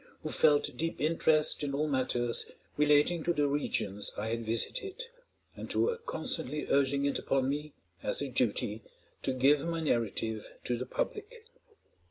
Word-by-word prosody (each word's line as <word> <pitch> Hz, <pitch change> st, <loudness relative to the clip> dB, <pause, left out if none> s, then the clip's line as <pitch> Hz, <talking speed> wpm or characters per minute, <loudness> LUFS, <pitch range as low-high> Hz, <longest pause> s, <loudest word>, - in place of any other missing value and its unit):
who -, -, -3 dB
felt 145 Hz, -1 st, +3 dB
deep 165 Hz, +1 st, -2 dB
interest 155 Hz, -1 st, +2 dB
in 140 Hz, -1 st, -2 dB
all 150 Hz, +2 st, 0 dB
matters 125 Hz, -4 st, +1 dB, 0.3 s
relating 150 Hz, +3 st, +3 dB
to 175 Hz, -, +1 dB
the 145 Hz, -2 st, +2 dB
regions 110 Hz, -8 st, -1 dB
I 110 Hz, +2 st, -2 dB
had 115 Hz, +1 st, -2 dB
visited, 365 Hz, -, -1 dB, 0.5 s
and -, -, -7 dB
who -, -, +2 dB
were 475 Hz, 0 st, +1 dB
constantly 150 Hz, -, -2 dB
urging 140 Hz, 0 st, +3 dB
it 140 Hz, -, +1 dB
upon 135 Hz, -1 st, 0 dB
me, 150 Hz, +1 st, -3 dB, 0.3 s
as -, -, +1 dB
a 140 Hz, -, -2 dB
duty, 120 Hz, -3 st, 0 dB, 0.4 s
to -, -, 0 dB
give 140 Hz, +4 st, +3 dB
my 165 Hz, -1 st, -1 dB
narrative 115 Hz, -6 st, -1 dB
to 125 Hz, -, 0 dB
the 125 Hz, +2 st, -5 dB
public. 440 Hz, +2 st, -4 dB
140 Hz, 160 wpm, -31 LUFS, 120-155 Hz, 0.5 s, felt